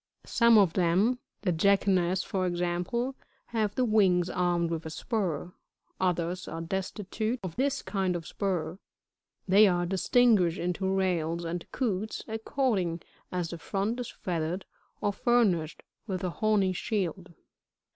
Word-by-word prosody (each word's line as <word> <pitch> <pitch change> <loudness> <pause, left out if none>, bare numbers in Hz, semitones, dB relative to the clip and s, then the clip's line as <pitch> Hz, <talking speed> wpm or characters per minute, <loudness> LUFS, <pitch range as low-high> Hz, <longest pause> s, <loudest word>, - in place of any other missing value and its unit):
67. - - -16
Some 235 -1 +6
of 190 -5 +5
them, 190 +8 +2 0.2
(the 185 - +2
Jacanas, 185 0 +2
for 185 -2 -1
example,) 180 +9 -1 0.4
have 215 -3 -1
the 255 - +2
wings 190 -6 +3
armed 175 -2 +1
with 165 -1 -2
a - - -5
spur; 180 -1 -2 0.5
others 180 0 -1
are 165 - -5
destitute 200 +6 -3
of 180 -3 -5
this 275 +1 0
kind 190 -2 -1
of 170 -2 -4
spur; 180 -3 -2 0.7
they 200 +3 +7
are 175 -2 +1
distinguished 190 -1 +3
into 180 +2 -1
Rails 170 -3 0
and 170 +1 -5
Coots, 215 -4 -2
according 220 - -1 0.3
as 180 -2 -2
the 170 - -6
front 205 +8 -2
is 245 - -4
feathered, 170 +1 -3 0.4
or 205 - +1
furnished 195 -9 +1 0.2
with 190 -2 -3
a 180 - -1
horny 205 -2 +2
shield. 185 -3 -3
185 Hz, 140 wpm, -29 LUFS, 175-215 Hz, 0.7 s, they